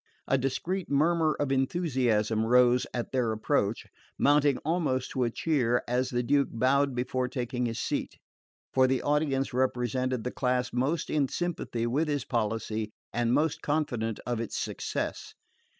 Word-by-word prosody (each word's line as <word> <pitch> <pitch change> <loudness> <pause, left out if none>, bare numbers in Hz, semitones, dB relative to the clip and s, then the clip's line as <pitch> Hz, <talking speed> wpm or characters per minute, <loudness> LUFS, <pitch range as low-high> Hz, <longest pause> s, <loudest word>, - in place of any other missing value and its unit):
A - - +3
discreet 150 +8 -2
murmur 155 +2 +2
of 145 -2 0
enthusiasm 130 -7 +1
rose 125 +1 +4
at 120 -1 -4
their 125 -4 +1
approach, 110 -1 0 0.3
mounting 145 -1 +4
almost 150 -6 0
to 130 -2 0
a - - +1
cheer 120 -3 +1
as 125 +2 0
the 120 0 -1
Duke 140 +3 +2
bowed 135 +3 +2
before 125 +1 -1
taking 125 -1 -2
his 115 - -4
seat; - - -3 0.6
for 130 0 +5
the 130 0 0
audience 145 -3 +1
represented 125 -1 0
the 125 - -3
class 125 -1 0
most 140 +6 0
in 145 -3 +2
sympathy 160 -8 -3
with 140 +7 0
his 145 -3 -1
policy 110 -2 -2 0.2
and 120 0 +1
most 155 +4 +1
confident 120 -8 -1
of 120 -2 -2
its 115 - -4
success. - - -4
130 Hz, 150 wpm, -28 LUFS, 120-145 Hz, 0.6 s, for